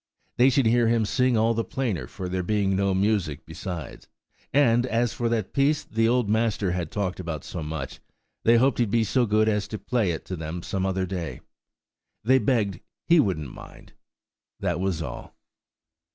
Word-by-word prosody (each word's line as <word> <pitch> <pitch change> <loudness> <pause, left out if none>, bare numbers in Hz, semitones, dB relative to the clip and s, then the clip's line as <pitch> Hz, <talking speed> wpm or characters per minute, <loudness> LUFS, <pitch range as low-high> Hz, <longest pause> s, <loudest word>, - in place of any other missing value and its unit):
They 125 +2 +6
should 135 -1 +2
hear 115 +1 +4
him 115 -1 +2
sing 125 +2 +2
all 115 +1 +3
the 115 0 -1
plainer 110 - -2
for 90 - -6
there 90 +1 -1
being 100 0 +1
no 100 0 +1
music 95 -7 0
besides; 80 -2 -7 0.4
and, 120 -3 +3
as 120 0 0
for 120 -2 -1
that 115 -2 -1
piece 145 +2 +2
the 115 +1 +1
old 125 -2 +2
Master 110 -3 +1
had 90 -3 -2
talked 95 -2 -3
about 85 -5 -4
so 85 - -6
much, 75 0 -5 0.4
they 115 +1 +5
hoped 130 +2 +3
he'd 120 -3 +2
be 115 +2 +2
so 120 +3 +1
good 110 +1 +3
as 105 -2 +1
to 110 - -5
play 115 -3 0
it 80 - -3
to 95 - -4
them 80 +1 -5
some 95 -1 -1
other 95 0 0
day.–They 95 - -4
begged 105 -6 0 0.3
he 170 0 +5
wouldn't 80 - 0
mind–that 80 - -8
was 90 -3 -1
all! 70 - -8
105 Hz, 180 wpm, -25 LUFS, 90-120 Hz, 0.4 s, They